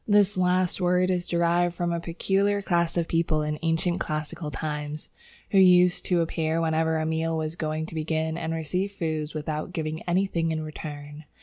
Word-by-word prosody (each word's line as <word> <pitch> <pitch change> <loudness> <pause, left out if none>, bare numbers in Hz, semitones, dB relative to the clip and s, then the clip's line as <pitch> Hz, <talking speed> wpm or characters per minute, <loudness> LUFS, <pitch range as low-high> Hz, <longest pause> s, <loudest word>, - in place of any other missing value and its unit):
This 205 -1 +4
last 185 0 +1
word 180 +1 +3
is 180 -1 -1
derived 170 0 +2
from 175 0 -1
a 170 - -1
peculiar 195 +4 0
class 170 -2 +1
of 170 -1 +1
people 165 -2 +1
in 150 0 -2
ancient 165 +2 0
classical 155 +1 -3
times, 150 0 -5 0.4
who 195 - +5
used 180 -1 +5
to 175 -2 +3
appear 160 0 0
whenever 160 0 +1
a 155 - -1
meal 160 0 0
was 155 0 -3
going 155 -1 -2
to 165 - -10
begin, 160 0 -1
and 165 -1 -3
received 180 +5 -2
food 155 -3 -2
without 155 +2 -3
giving 155 -1 -3
anything 175 -2 +1
in 155 -1 -2
return. 150 -1 -8
165 Hz, 180 wpm, -26 LUFS, 155-180 Hz, 0.4 s, who